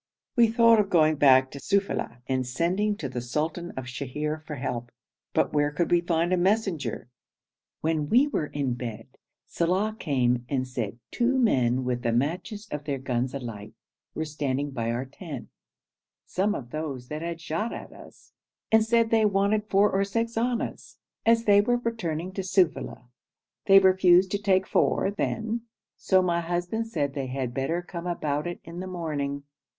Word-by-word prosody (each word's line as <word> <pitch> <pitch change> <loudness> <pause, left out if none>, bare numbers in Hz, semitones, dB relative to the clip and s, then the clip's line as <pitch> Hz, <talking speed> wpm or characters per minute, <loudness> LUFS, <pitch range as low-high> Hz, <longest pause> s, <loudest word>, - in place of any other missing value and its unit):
"' - - -66
We 235 -2 +6
thought 230 0 +5
of 200 -2 +1
going 155 -4 +4
back 130 -2 +5
to 140 - -8
Sufeila, 195 - -1
and 130 -1 -1
sending 185 +10 0
to 150 - -4
the 125 -2 -4
sultan 155 +7 -2
of 130 - -4
Sheher 150 +4 -4
for 150 - -4
help, 120 -3 -4 0.4
but - - +1
where 145 -1 +2
could 150 +4 -1
we 175 0 +5
find 170 +1 +1
a - - +3
messenger? 180 - 0 0.7
When 155 -2 0
we 255 +5 +5
were 225 - -2
in 140 -4 -2
bed, 115 -2 -6 0.4
Saleh 195 +6 0
came 125 -4 +1
and 130 -2 -1
said 115 -4 -4
two 255 +2 +1
men 130 - +2
with 125 -1 -1
the 120 -1 0
matches 180 - -2
of 150 0 -4
their 140 -2 -1
guns 130 0 -2
alight 110 -5 -7 0.4
were 160 - -2
standing 145 -2 -2
by 115 -3 -2
our 120 +3 -2
tent; 140 -1 -8 0.8
some 205 +3 0
of 120 -2 -7
those 140 -5 -5
that 150 +1 -4
had 170 0 -4
shot 165 +8 -2
at - - -8
us, - - -16 0.4
and 220 0 +6
said 230 0 +2
they 225 -1 +4
wanted 210 +1 +1
four 200 +2 +4
or 195 +1 +2
six 230 +4 -2
annas, 240 +1 -2 0.3
as 230 0 +5
they 205 -2 +6
were 245 +4 +1
returning 185 -8 -3
to 195 - -3
Sufeila. 180 -7 0 0.6
They 195 -1 +8
refused 185 -1 +5
to 205 - -1
take 190 -2 +3
four 195 - +1
then, 220 +3 -2 0.3
so 185 -1 +3
my 170 -1 +1
husband 175 +6 -2
said 145 -11 -2
they 135 -2 -3
had 130 -2 -3
better 150 +7 -1
come 175 -1 -6
about 150 -3 -1
it 175 - -5
in 170 +1 -8
the 185 - -5
morning. 145 -6 -3
165 Hz, 175 wpm, -26 LUFS, 135-200 Hz, 0.8 s, They